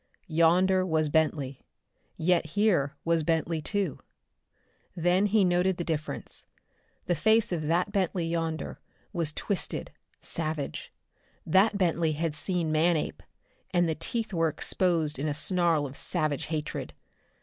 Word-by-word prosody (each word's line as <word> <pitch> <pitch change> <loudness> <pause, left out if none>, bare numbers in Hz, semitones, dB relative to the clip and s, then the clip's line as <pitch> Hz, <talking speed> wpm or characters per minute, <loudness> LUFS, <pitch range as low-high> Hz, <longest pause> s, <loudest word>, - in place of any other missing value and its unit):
Yonder 180 +3 +3
was 160 -4 +1
Bentley, 145 -4 0 0.6
yet 175 +1 +2
here 175 -9 +2
was 165 -1 +2
Bentley, 160 0 0
too. 195 -3 -2 1.0
Then 180 +4 +2
he 205 -1 +3
noted 180 +1 +2
the 175 - -2
difference. 155 -2 -5 0.6
The 175 - +1
face 220 +6 +3
of 170 -3 -1
that 175 +5 +1
Bentley 185 -3 0
yonder 165 -1 -3 0.3
was 165 -3 0
twisted, 195 +4 -3 0.3
savage. 155 -3 -4 0.5
That 195 +5 +4
Bentley 170 -4 +1
had 160 +1 -2
seen 170 0 -1
Manape, 160 +1 +1 0.5
and 175 -1 +2
the 160 - +1
teeth 220 +7 -2
were 165 -1 +2
exposed 160 -1 +1
in 150 - -1
a 145 - -1
snarl 165 -1 +2
of 135 -1 -7
savage 155 -4 -1
hatred. 155 -1 -4
165 Hz, 130 wpm, -28 LUFS, 155-180 Hz, 1.0 s, That